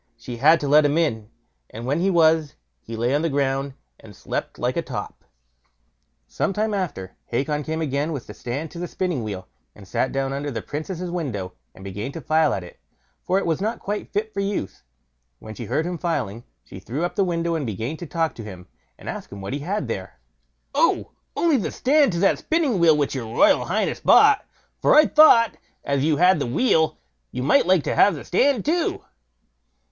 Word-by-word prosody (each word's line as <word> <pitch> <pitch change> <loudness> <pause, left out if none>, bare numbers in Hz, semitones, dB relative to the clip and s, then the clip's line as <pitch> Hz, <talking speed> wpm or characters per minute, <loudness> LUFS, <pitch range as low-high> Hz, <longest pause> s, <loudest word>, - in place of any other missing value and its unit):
She 120 +1 -8
had 155 +6 +5
to 145 - -2
let 150 +2 +6
him 145 +2 +2
in, 110 -10 0 0.4
and 115 +2 -8
when 140 +5 0
he 190 +3 +2
was, 160 -4 +3 0.2
he 115 - -8
lay 120 +3 0
on 145 - +2
the 165 - 0
ground 135 -1 -1 0.2
and 105 -3 -14
slept - - -5
like - - -1
a - - 0
top. - - -7 1.0
Some - - -2
time 215 +2 -1
after, 160 - -4
Hacon 145 +5 -1
came 160 +2 -3
again 145 +2 -1
with 140 -6 -5
the - - -10
stand 140 +6 -5
to 170 - -8
the 175 - -3
spinning 175 -9 -2
wheel, 95 -4 -6 0.3
and 100 -2 -14
sat 130 - -1
down 135 0 -2
under 140 +1 -3
the 115 -5 -5
Princess' 170 +4 -5
window, 120 - -4 0.2
and 95 - -13
began 105 +6 -5
to - - -6
file 155 +2 +2
at 95 - -2
it, 90 - -14 0.4
for 185 - 0
it 195 - 0
was 165 +1 -1
not 220 +3 -1
quite 205 +1 -5
fit 215 +1 -2
for 200 - -4
use. 195 - -3 0.6
When 110 - -10
she 115 - -7
heard 145 +8 -1
him 175 -1 -4
filing, 120 - -3 0.2
she 95 - -11
threw 130 - -4
up 175 - -1
the 200 - +2
window 170 -2 -1
and 160 -3 -1
began 115 +8 -4
to 175 - -8
talk 165 0 -1
to 115 - -9
him, 95 -4 -10 0.3
and - - -15
to - - -2
ask - - -9
what 100 +4 -6
he 140 - -2
had 175 - -3
there. 95 - -6 0.5
"Oh! - - +2 0.3
only 330 -4 +3
the 215 - -2
stand 285 -1 +3
to 170 - -1
that 195 - +3
spinning 310 - 0
wheel 165 -3 +5
which 145 -2 0
your 130 -4 -4
royal 285 - +3
highness - - -1
bought; 425 -1 +5 0.4
for - - +4
I 305 0 +8
thought, 240 -9 +6 0.3
as 140 -1 0
you 155 -1 +2
had 180 +1 +4
the 140 - -2
wheel, 160 - +2 0.3
you 125 - -4
might 175 - +3
like 185 -4 +4
to - - -1
have 200 -3 +4
the 145 - -9
stand 255 +4 +2
too." 330 +3 0
155 Hz, 215 wpm, -23 LUFS, 120-185 Hz, 1.0 s, I